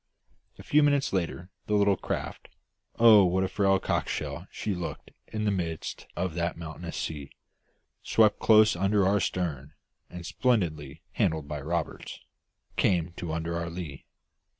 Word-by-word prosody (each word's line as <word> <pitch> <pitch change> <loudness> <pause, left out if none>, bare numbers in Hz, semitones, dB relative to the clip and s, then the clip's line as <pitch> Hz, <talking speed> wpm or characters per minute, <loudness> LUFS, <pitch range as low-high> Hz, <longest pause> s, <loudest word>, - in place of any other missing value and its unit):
A - - -11
few 150 - +4
minutes 145 -4 +2
later, 90 0 -2 0.2
the 105 - +1
little 100 -1 +4
craft - - -5 0.5
oh, 110 -3 +8
what 95 +1 +2
a - - +1
frail 95 0 +2
cockleshell - - -2
she 105 - -3
looked 85 -4 -6 0.2
in 110 -1 -3
the 105 - +2
midst 85 -4 -4
of 90 -1 -2
that 85 0 -2
mountainous 85 +1 -7
sea! 75 -4 -4 0.7
swept 110 -2 +3
close 110 -2 +6
under 100 +2 +2
our 100 +2 +3
stern 75 -7 -3 0.4
and, 90 -1 -8
splendidly 80 - -1
handled 80 -9 0
by 75 -1 -5
Roberts, 80 +2 -4 0.6
came 85 -3 +2
to 85 -2 -4
under 80 +1 -2
our 85 0 -3
lee. 85 -5 -7
90 Hz, 150 wpm, -28 LUFS, 80-100 Hz, 0.7 s, oh